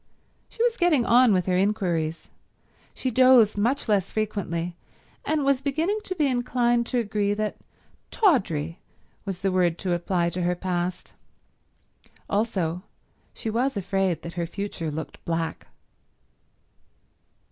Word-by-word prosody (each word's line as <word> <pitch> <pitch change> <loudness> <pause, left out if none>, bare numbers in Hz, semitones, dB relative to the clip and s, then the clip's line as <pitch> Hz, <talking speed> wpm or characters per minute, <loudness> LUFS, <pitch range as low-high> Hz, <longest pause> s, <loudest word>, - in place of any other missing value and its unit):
She 460 - -2
was 480 0 +1
getting 320 -9 +3
on 245 0 +5
with 185 -3 +2
her 185 - +1
inquiries. 180 -5 0 0.7
She 260 - -2
dozed 250 -3 +6
much 240 +8 0
less 205 -4 +1
frequently, 180 -5 -2 0.5
and 305 -2 0
was 275 -1 +2
beginning 320 +9 0
to 370 - -3
be 310 -4 +2
inclined 245 -2 +1
to 250 - -1
agree 205 -3 0
that 215 0 -2 0.5
tawdry 170 - +1 0.5
was 195 -3 -5
the 195 -1 +1
word 175 -2 +2
to 180 -2 -1
apply 175 0 0
to 180 - -3
her 180 0 +1
past. 180 0 -3 1.1
Also 185 -5 -1 0.5
she 220 - -5
was 245 +2 0
afraid 190 -2 -1
that 170 - -7
her 170 -1 -3
future 195 -3 -4
looked 155 +1 -7
black. 165 -1 -3
200 Hz, 135 wpm, -25 LUFS, 175-245 Hz, 1.1 s, dozed